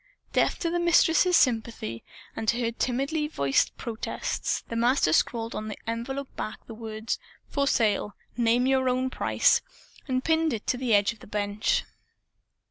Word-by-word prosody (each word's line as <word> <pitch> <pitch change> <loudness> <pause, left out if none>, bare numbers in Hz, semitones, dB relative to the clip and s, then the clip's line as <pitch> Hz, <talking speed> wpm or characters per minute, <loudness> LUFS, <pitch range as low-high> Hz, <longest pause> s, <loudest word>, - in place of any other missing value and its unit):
Deaf - - +2
to 335 - -1
the 345 - 0
Mistress's 345 +1 +4
sympathy 225 - 0 0.3
and 225 - -4
to 235 +3 +2
her 230 -1 0
timidly 275 +6 -1
voiced 140 - +1
protests, 230 -3 -3
the 230 - -5
Master 235 - +3
scrawled 230 +5 +1
on 215 0 -4
an 210 - -6
envelope 255 +4 -4
back 215 - -4
the 230 - -9
words 220 0 -4 0.3
"For 280 -1 0
Sale. 210 -4 +1 0.2
Name 240 +1 +3
Your 260 -1 +2
Own 255 +1 0
Price," - - +3 0.5
and 255 -1 0
pinned 320 -2 +2
it 220 +2 -1
on 250 - -6
the 240 -4 +3
edge 205 +2 +3
of 225 - -20
the - - -13
bench. 210 - 0
235 Hz, 165 wpm, -27 LUFS, 220-270 Hz, 0.5 s, Mistress's